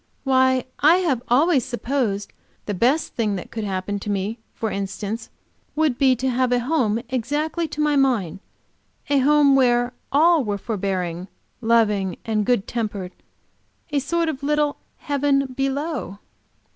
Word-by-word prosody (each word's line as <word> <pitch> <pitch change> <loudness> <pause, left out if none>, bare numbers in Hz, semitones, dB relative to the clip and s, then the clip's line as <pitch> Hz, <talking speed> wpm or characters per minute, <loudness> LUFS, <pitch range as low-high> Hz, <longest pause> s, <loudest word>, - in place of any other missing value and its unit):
Why 260 -1 +3
I 310 +4 +6
have 325 -10 +1
always 275 +2 +3
supposed 240 -5 -2 0.3
the 205 - -2
best 250 - +1
thing 215 -4 0
that 180 - -7
could 220 - -4
happen 200 0 -3
to 210 - -6
me, 205 +3 -2 0.2
instance, 205 +1 -3 0.5
would 305 -5 +1
be 265 -2 +4
to 255 +2 -2
have 250 0 +1
a 245 0 +2
home 240 -5 +1
exactly 295 +7 -1
to 305 - -8
my 300 -1 +2
mind; 245 - +1 0.7
a 285 - +4
home 285 0 +5
where 245 -2 +3 0.2
all 320 +1 +4
were 205 -3 -2
forbearing, 185 -4 -3 0.3
loving 210 -5 +2
and 215 -2 0
good 245 -6 +1
tempered, 205 -6 -3 0.8
a 290 - +2
sort 330 +5 -1
of 290 -4 -3
little 295 0 +1 0.2
heaven 275 -2 0
below." 275 - -2
250 Hz, 145 wpm, -22 LUFS, 210-285 Hz, 0.8 s, I